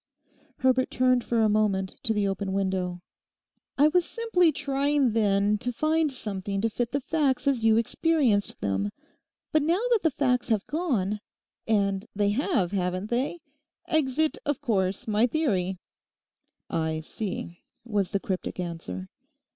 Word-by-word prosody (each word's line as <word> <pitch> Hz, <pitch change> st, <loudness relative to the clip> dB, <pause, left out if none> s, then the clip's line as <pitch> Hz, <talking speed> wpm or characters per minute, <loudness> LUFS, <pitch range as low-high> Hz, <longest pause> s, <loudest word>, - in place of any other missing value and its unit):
Herbert 260 Hz, 0 st, +2 dB
turned 255 Hz, -1 st, +2 dB
for 230 Hz, -2 st, +1 dB
a -, -, +5 dB
moment 205 Hz, -3 st, +1 dB
to 235 Hz, -, 0 dB
the 210 Hz, -2 st, +1 dB
open 195 Hz, 0 st, -2 dB
window. 185 Hz, -2 st, -1 dB, 0.8 s
'I 295 Hz, +2 st, +6 dB
was 355 Hz, +2 st, +3 dB
simply 365 Hz, -6 st, +2 dB
trying 280 Hz, -2 st, +1 dB
then 205 Hz, -1 st, +2 dB
to 245 Hz, +2 st, -2 dB
find 310 Hz, +4 st, +1 dB
something 200 Hz, -5 st, -4 dB
to 225 Hz, +1 st, 0 dB
fit 240 Hz, +1 st, -2 dB
the 280 Hz, -, 0 dB
facts 280 Hz, -2 st, 0 dB
as 260 Hz, -5 st, +2 dB
you 225 Hz, 0 st, +5 dB
experienced 235 Hz, -3 st, +1 dB
them. 100 Hz, 0 st, -1 dB, 0.6 s
But 310 Hz, -, +3 dB
now 335 Hz, +5 st, +2 dB
that 465 Hz, -, +5 dB
the 325 Hz, -, +3 dB
facts 250 Hz, -4 st, 0 dB
have 215 Hz, -3 st, +1 dB
gone—and 210 Hz, -, -2 dB
they 205 Hz, 0 st, +2 dB
have, 205 Hz, -, +1 dB
haven't 185 Hz, +1 st, -2 dB
they?—exit, 295 Hz, +1 st, -2 dB
of 290 Hz, -2 st, -1 dB
course, 200 Hz, -8 st, -1 dB
my 215 Hz, +3 st, +3 dB
theory!' 195 Hz, -, 0 dB, 0.9 s
'I 160 Hz, -1 st, -1 dB
see,' 175 Hz, -1 st, -5 dB, 0.2 s
was 205 Hz, -5 st, 0 dB
the 200 Hz, -, 0 dB
cryptic 190 Hz, -1 st, -4 dB
answer. 165 Hz, -, -5 dB
225 Hz, 140 wpm, -27 LUFS, 195-280 Hz, 0.9 s, I